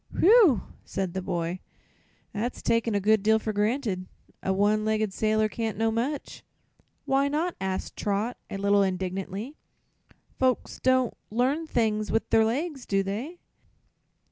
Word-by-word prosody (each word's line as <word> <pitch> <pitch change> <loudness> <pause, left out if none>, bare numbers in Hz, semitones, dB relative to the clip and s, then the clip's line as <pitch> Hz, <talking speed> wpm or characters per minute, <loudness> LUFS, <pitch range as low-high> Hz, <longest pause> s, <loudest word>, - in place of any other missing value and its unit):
"Whew!" 385 - +6 0.2
said 190 -3 -3
the 190 - -2
boy; 175 0 -2 0.7
"that's 230 +4 -3
taking 230 -1 +1
a - - +3
good 215 +1 +3
deal 220 +2 +4
for 220 0 -3
granted. 210 -3 -1 0.3
A 190 - -1
one 205 +2 +2
legged 215 -2 0
sailor 215 +1 +2
can't 220 -1 -3
know 225 +1 +1
much." 255 +6 -3 0.6
"Why 275 +1 +2
not?" 320 +5 -1
asked 190 -1 -3
Trot, 210 +4 -1
a - - -4
little 200 +1 +3
indignantly. 190 - -3 0.8
"Folks 255 -1 0
don't 260 -2 +2 0.2
learn 265 +8 0
things 215 -5 0
with 225 - 0
their 225 - +5
legs, 270 +5 -2
do 195 -1 +1
they?" 230 - -4
220 Hz, 145 wpm, -27 LUFS, 200-255 Hz, 0.8 s, Whew